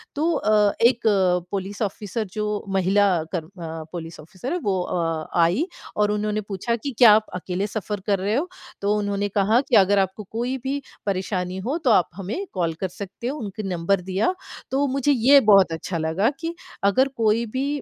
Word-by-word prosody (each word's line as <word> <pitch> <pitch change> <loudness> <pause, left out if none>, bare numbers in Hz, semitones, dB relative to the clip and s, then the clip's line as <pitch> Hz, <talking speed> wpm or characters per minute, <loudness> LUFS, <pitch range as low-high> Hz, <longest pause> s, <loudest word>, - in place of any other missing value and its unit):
तो 315 +4 +1
अ, 210 -5 +3
1 235 +1 +4 0.5
police 200 +1 -4
officer 210 +1 -2
जो 210 0 -2 0.3
महिला 195 +2 +3 0.3
कर्म 165 -4 -3 0.2
अ, 160 0 -5
पुलिस 165 -1 -7
ऑफ़िसर 200 - -6
है, - - 0
वो 195 -2 +1
अ, 165 -3 -2
आई 180 - +2 0.3
और 210 0 +2
उन्होंने 210 0 -1
पूछा 205 +3 -2
कि 255 +5 -5
क्या 235 -4 +9
आप 215 0 +2
अकेले 185 +2 -2
सफ़र 210 -1 -4
कर 200 -2 +2
रहे 205 +4 0
हो? 310 +7 0 0.3
तो 205 +1 +1
उन्होंने 205 0 -1
कहा 205 +4 +3
कि 250 - +4
अगर 200 -1 +5
आपको 190 +2 -1
कोई 245 +4 -2
भी 275 +1 -2 0.2
परेशानी 185 -2 -2
हो 285 +5 0
तो 245 - +5
आप 185 -5 +4
हमें 200 - -4
कॉल 170 -3 0
कर 190 - 0
सकते 195 +5 -7
हो, 280 +4 -3
उनका 210 -1 -6
नंबर 180 +2 0
दिया। 190 - 0 0.4
तो 275 +2 +2
मुझे 275 +2 +1
ये 275 +2 +6
बहुत 195 -4 +6
अच्छा 165 +2 -4
लगा 160 +7 +1
कि 330 +1 -4 0.3
अगर 230 +7 +4
कोई 225 +1 +2
भी 270 +2 0
205 Hz, 190 wpm, -23 LUFS, 185-235 Hz, 0.5 s, क्या